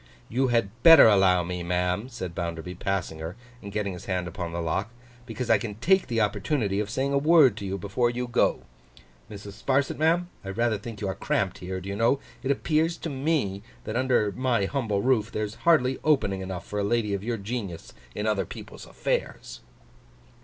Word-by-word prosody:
'You 130 +3 +1
had 115 -5 +1
better 165 0 +10
allow 95 -4 +4
me, 90 +1 -4
ma'am,' 90 +6 -1
said 95 -9 -6
Bounderby, 85 +1 -4
passing 90 -3 -3
her, 80 +4 -6 0.3
and 100 - -8
getting 100 -2 -2
his 90 - -9
hand 90 -2 -2
upon 85 0 -5
the 85 - -4
lock; 85 +5 -1 0.4
'because 125 - -4
I - - +4
can 105 -4 -5
take 190 - +2
the 115 -1 -1
opportunity 105 -1 0
of 105 -1 -2
saying 135 +5 -1
a 140 - +3
word 150 -6 +5
to 100 - -5
you, 95 +1 -2
before 105 +5 0
you 125 +1 -3
go. 120 - +1 0.7
Mrs. 100 0 -10
Sparsit, 135 +1 +1
ma'am, 170 +3 +2 0.2
I 95 - -7
rather 110 +1 0
think 110 -1 -8
you 100 - -1
are 95 - -1
cramped - - -1
here, 95 +1 -5
do 90 - -10
you 100 - -3
know? 115 +6 +2 0.2
It 130 - -3
appears 155 +4 +1
to 165 - -5
me, 135 -9 -1 0.2
that, 110 - -5
under 120 -5 +2
my 125 -3 0
humble 105 -5 -1
roof, 115 -4 +2
there's 105 -1 -3 0.2
hardly 130 -5 +3
opening 115 -11 +2
enough 95 -1 -6
for 105 - -4
a - - 0
lady 105 0 0
of 100 0 -3
your 115 +1 -2
genius 100 -5 -5 0.2
in 105 - -3
other 100 -5 0
people's - - -10
affairs. - - -3
105 Hz, 200 wpm, -26 LUFS, 95-130 Hz, 0.7 s, better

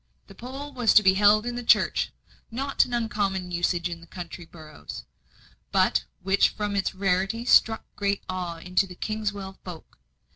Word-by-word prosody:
The - - -14
poll 270 +7 -8
was 245 -4 +2
to 215 - +8
be 190 -1 +6
held 210 +2 +4
in 245 0 -3
the 245 - -3
church - - +3 0.2
a 225 - -18
not 275 +2 +2
uncommon 205 -6 -2
usage 175 0 0
in 170 -1 -7
country 175 0 -8
boroughs, 155 -3 -10 0.7
but - - +2 0.2
which 195 +1 +4
from 205 -1 -3
its 195 -1 -1
rarity 195 +4 0
struck 225 -2 +4
great 200 -1 -1
awe 180 -2 -4
into 180 +3 0
the 180 - -11
Kingswell 205 -2 -4
folk. 170 - -11
195 Hz, 160 wpm, -26 LUFS, 180-220 Hz, 0.7 s, to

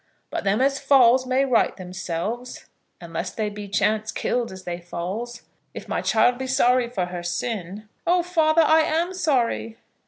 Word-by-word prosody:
"But - - -3
them 200 +4 +2
as 275 +1 +2
falls 260 -2 +5
may 260 +2 +2
right 250 -4 +2
themselves, 190 +6 -5 0.3
unless 170 +1 -5
they 215 +1 -3
be 205 0 -7
chance 215 +2 0
killed 240 -1 -2
as 190 0 -10
they 175 -1 -5
falls. 195 +8 -6 0.3
If - - -8
my - - -2
child 245 0 +2
be 265 - -3
sorry 250 -2 +2
for 190 -7 -2
her 175 0 -6
sin 200 +2 -4
" - - -24
"Oh, 350 0 +3
father, 330 -2 +3
I 315 +1 +5
am 330 +4 0
sorry." 255 -9 0
235 Hz, 175 wpm, -23 LUFS, 190-270 Hz, 0.3 s, falls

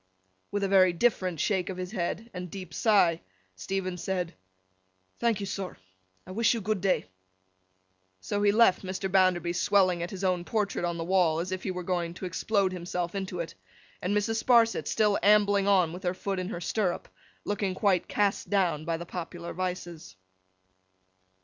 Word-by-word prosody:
With 205 0 -2
a - - +2
very 185 -2 +5
different 185 -4 +1
shake 190 -3 0
of 185 - -5
the 185 - -3
head 200 +4 -4
and 180 -1 -6
deep 185 -2 -8
sigh, 180 -7 +3 0.3
Stephen 185 - -3
said, 180 -1 -2 0.9
'Thank 230 -3 +1
you, - - -2
sir, 195 -1 -5 0.5
I 185 - -10
wish 230 +4 +2
you - - -2
good 210 -1 -1
day.' 195 -1 +1 1.1
So 205 - -2
he 205 0 +5
left 215 -3 +4
Mr. 190 0 -4
Bounderby 185 -3 +3
swelling 185 -1 +3
at 170 - -3
his 195 -1 -7
own 180 -2 +1
portrait 200 -2 -1
on 170 -1 -2
the 165 - -3
wall, 170 -3 +2
as 180 +2 -3
if 185 0 -3
he - - -4
were 180 -1 -4
going 175 -1 -2
to 185 - -6
explode 195 +1 0
himself 175 -1 -3
into 190 -2 -4
it; 165 - -6 0.5
and 200 +3 0
Mrs. 220 +2 0
Sparsit 235 -2 +4
still 210 -2 +2
ambling 205 -1 +4
on 185 -5 +3
with 180 - -7
her 180 -1 -1
foot 195 0 -3
in 185 0 -3
her 175 - -5
stirrup, 185 -1 -1 0.4
looking 200 -2 -1
quite 190 -2 +2
cast 205 -1 0
down 180 -6 +1
by 165 0 -1
the 170 - -7
popular 170 0 -6
vices. 175 - -5
185 Hz, 180 wpm, -28 LUFS, 175-200 Hz, 1.1 s, very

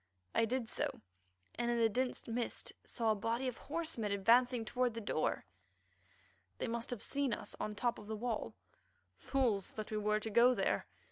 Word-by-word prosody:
I 230 - +4
did 245 0 -1
so, - - -2 0.5
and 240 0 -1
in 240 - +2
the 230 -1 +5
dense 250 +4 -1
mist 235 +1 -2
saw 225 -3 +1
a - - +2
body 230 +5 -1
of 250 - -3
horsemen 300 -9 -2
advancing 235 +4 +4
toward 250 0 0
the - - -2
door. 200 -7 0 1.1
They - - -2
must 235 0 -2
have 245 -4 -2
seen 280 -3 0
us - - -4
on 210 - -2
the 205 - -9
top 240 -1 +1
of 205 - -11
the 220 - -2
wall. 230 0 -2 0.6
"Fools 235 -8 0
that 215 0 -5
we 215 - 0
were 210 0 +2
to 220 +1 -4
go 245 +4 +6
there!" - - +1
230 Hz, 190 wpm, -36 LUFS, 215-250 Hz, 1.1 s, go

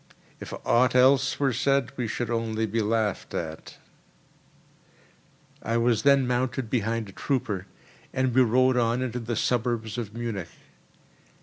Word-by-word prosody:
If - - -8
aught 125 +2 +3
else 135 +1 +4
were 135 -3 +2
said 135 +1 +1
we 125 -3 -2
should 120 +1 -3
only 110 -1 -1
be 110 +2 -1
laughed 110 -2 -1
at." 80 -1 -6 1.8
I 115 +1 -1
was 115 -2 +2
then 140 -1 +4
mounted 125 -1 -1
behind 115 -2 -1
a - - -10
trooper, 105 -5 -2 0.4
and 130 -1 0
we 130 - +5
rode 130 +2 +3
on 120 +1 +1
into 125 -1 -3
the 115 0 -3
suburbs 120 -1 -1
of 110 -2 -6
Munich. 110 -7 -4
120 Hz, 140 wpm, -26 LUFS, 110-130 Hz, 1.8 s, we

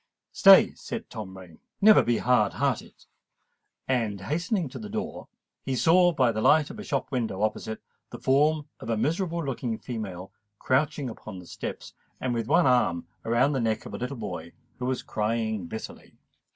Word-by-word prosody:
"Stay!" - - +7 0.2
cried - - -4
Tom 95 -4 -7
Rain: 90 -4 -13 0.2
"never 215 +1 +7
be 120 -1 +1
hard 120 -5 +2
hearted!" 135 0 -2 0.8
And, 115 -6 0
hastening 170 - -1
to - - -8
the 215 - -7
street 210 - -11
door, 220 +1 -4 0.3
he 135 - -2
saw, 175 +6 +5
by 130 -7 +2
the 110 -1 -3
light 155 +3 +4
of - - -10
a - - -6
shop 140 -8 -2
window 110 -6 -1
opposite, 110 0 -2 0.3
the - - -8
form 150 +3 +2
of - - -8
a 115 - +1
miserable 165 - -1
looking 120 -4 -3
female 100 -7 -6 0.3
crouching 140 +3 0
upon 110 -4 -8
the 90 - -10
steps, - - -7 0.3
and 125 -1 -1
with 115 -2 -2
one 165 +5 +4
arm 120 -10 +2 0.2
round 125 +5 +2
the 135 - 0
neck 110 -1 -1
of - - -8
a - - -3
little 125 +2 -4
boy 85 -7 -6 0.3
who 125 - -3
was 130 -1 -2
crying 110 -3 -2
bitterly. 110 +5 -8
125 Hz, 180 wpm, -27 LUFS, 110-150 Hz, 0.8 s, Stay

